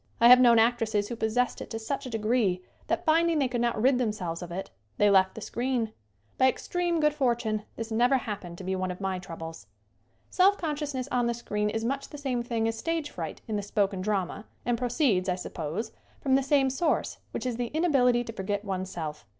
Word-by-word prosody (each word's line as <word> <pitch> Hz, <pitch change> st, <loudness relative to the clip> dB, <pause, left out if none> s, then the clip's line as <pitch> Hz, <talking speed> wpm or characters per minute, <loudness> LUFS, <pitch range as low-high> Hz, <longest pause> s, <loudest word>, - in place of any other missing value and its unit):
I 235 Hz, -, +7 dB
have 250 Hz, 0 st, +10 dB
known 240 Hz, -2 st, +6 dB
actresses 225 Hz, -3 st, +2 dB
who 235 Hz, -, -3 dB
possessed 230 Hz, +3 st, 0 dB
it -, -, -7 dB
to 225 Hz, -, -4 dB
such 260 Hz, +4 st, -4 dB
a -, -, -5 dB
degree 215 Hz, -5 st, +1 dB, 0.2 s
that, -, -, -1 dB
finding 330 Hz, +1 st, +3 dB
they 275 Hz, -3 st, +2 dB
could 245 Hz, -1 st, -2 dB
not 235 Hz, -2 st, 0 dB
rid 255 Hz, +3 st, +4 dB
themselves 195 Hz, -8 st, -2 dB
of 175 Hz, -1 st, -7 dB
it, 190 Hz, +3 st, -5 dB, 0.3 s
they 205 Hz, 0 st, +4 dB
left 190 Hz, -1 st, +4 dB
the 220 Hz, -, -7 dB
screen. 240 Hz, -1 st, -1 dB, 0.5 s
By 260 Hz, -, +6 dB
extreme 345 Hz, +4 st, -1 dB
good 300 Hz, -1 st, +3 dB
for 260 Hz, -5 st, +2 dB
tune 215 Hz, -2 st, -3 dB
this 225 Hz, 0 st, -6 dB
never 245 Hz, +4 st, +4 dB
happened 200 Hz, -7 st, -6 dB
to 190 Hz, -, -8 dB
be 190 Hz, +1 st, -1 dB
one 185 Hz, 0 st, -2 dB
of 180 Hz, -, -5 dB
my 190 Hz, -2 st, -2 dB
trou 175 Hz, -2 st, -8 dB
bles. 165 Hz, 0 st, -8 dB, 0.6 s
Self 390 Hz, +2 st, +4 dB
consciousness 290 Hz, -5 st, -3 dB
on 245 Hz, -1 st, +2 dB
the 235 Hz, -, 0 dB
screen 210 Hz, -3 st, -2 dB
is 225 Hz, +1 st, -2 dB
much 275 Hz, +3 st, -2 dB
the 295 Hz, -, -8 dB
same 265 Hz, -4 st, -1 dB
thing 230 Hz, -2 st, -1 dB
as 225 Hz, -, -1 dB
stage 330 Hz, -3 st, -2 dB
fright 165 Hz, -3 st, -6 dB
in 215 Hz, -2 st, -1 dB
the -, -, -1 dB
spoken 200 Hz, -1 st, 0 dB
drama 200 Hz, 0 st, -2 dB, 0.2 s
and 240 Hz, 0 st, +2 dB
proceeds, 235 Hz, -, +1 dB
I 180 Hz, -, +1 dB
suppose, 180 Hz, +4 st, -4 dB, 0.3 s
from 270 Hz, -, 0 dB
the 270 Hz, -, +5 dB
same 270 Hz, -1 st, +3 dB
source, 310 Hz, +4 st, 0 dB
which -, -, -5 dB
is 245 Hz, -2 st, -2 dB
the 245 Hz, -1 st, -1 dB
inability 260 Hz, -6 st, +3 dB
to 225 Hz, -, -7 dB
forget 205 Hz, +1 st, -3 dB
one's 190 Hz, -1 st, -3 dB
self. 150 Hz, -, -6 dB
230 Hz, 225 wpm, -28 LUFS, 200-260 Hz, 0.6 s, have